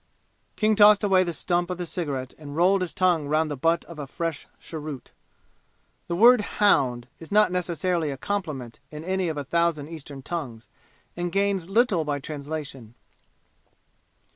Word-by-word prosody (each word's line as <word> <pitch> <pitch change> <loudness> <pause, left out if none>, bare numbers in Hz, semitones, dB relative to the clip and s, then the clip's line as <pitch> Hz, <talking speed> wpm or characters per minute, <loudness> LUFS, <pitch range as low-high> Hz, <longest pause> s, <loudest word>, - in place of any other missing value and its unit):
King 215 0 +2
tossed 210 0 +7
away 190 -2 +4
the 175 - -2
stump 175 +4 -1
of 180 - -3
the 180 - -4
cigarette 140 -7 -4
and 145 -2 -9
rolled 185 +4 +3
his 180 -3 -2
tongue 175 -5 +1
round 155 +1 +1
the - - -2
butt 165 +5 +1
of 170 -3 -11
a 145 - -5
fresh 165 +1 -4
cheroot. 155 -4 -8 1.0
The 170 - -2
word 235 +4 +7 0.2
"hound" 125 - +3
is 165 - -12
not 210 -2 +4
necessarily 175 -2 -1
a 135 - -4
compliment 150 - -4
in 150 0 -8
any 185 +1 -1
of 155 - -4
a 145 - -2
thousand 160 0 0
Eastern 145 -4 -9
tongues 130 -10 -6 0.5
and 175 0 -3
gains 195 -2 0
little 205 -5 +3
by 145 -1 -1
translation. 140 -5 -7
165 Hz, 165 wpm, -25 LUFS, 145-185 Hz, 1.0 s, tossed